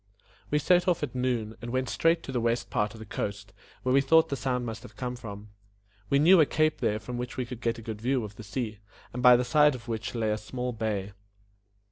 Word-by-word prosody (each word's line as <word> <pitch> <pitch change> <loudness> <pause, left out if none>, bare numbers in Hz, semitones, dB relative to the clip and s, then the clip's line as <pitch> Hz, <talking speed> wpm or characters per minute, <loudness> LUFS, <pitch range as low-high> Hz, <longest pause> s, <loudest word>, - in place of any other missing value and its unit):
We 150 - +2
set 180 +4 +3
off 175 -4 +2
at 140 - -3
noon, 120 -4 -1
and 120 - -6
went 130 +1 -1
straight 165 +1 +2
to - - -6
the 125 -2 -1
west 115 +1 -1
part 105 +1 0
of - - -11
the 110 - -8
coast, 100 -1 -5 0.3
where 130 - +1
we 140 - +5
thought 160 +4 +4
the 140 - -1
sound 125 0 -1
must 115 -1 -5
have - - -13
come 125 -2 -4
from. 105 -3 -9 0.6
We 140 - +4
knew 165 +4 +7
a - - +6
cape 155 0 +1
there 105 - +1
from 120 +3 -6
which 125 0 -5
we 130 - -1
could 120 0 -8
get 115 -1 0
a 115 - -9
good 110 -1 -6
view 125 +1 +1
of 105 -1 -8
the - - -10
sea, 105 0 -4 0.3
and 125 - -4
by 125 0 +8
the 125 +1 +1
side 150 +3 +4
of 120 -1 -11
which 110 0 -4
lay 110 -2 0
a 105 - -1
small 125 +3 -4
bay. 105 -3 -2
120 Hz, 250 wpm, -28 LUFS, 110-130 Hz, 0.6 s, by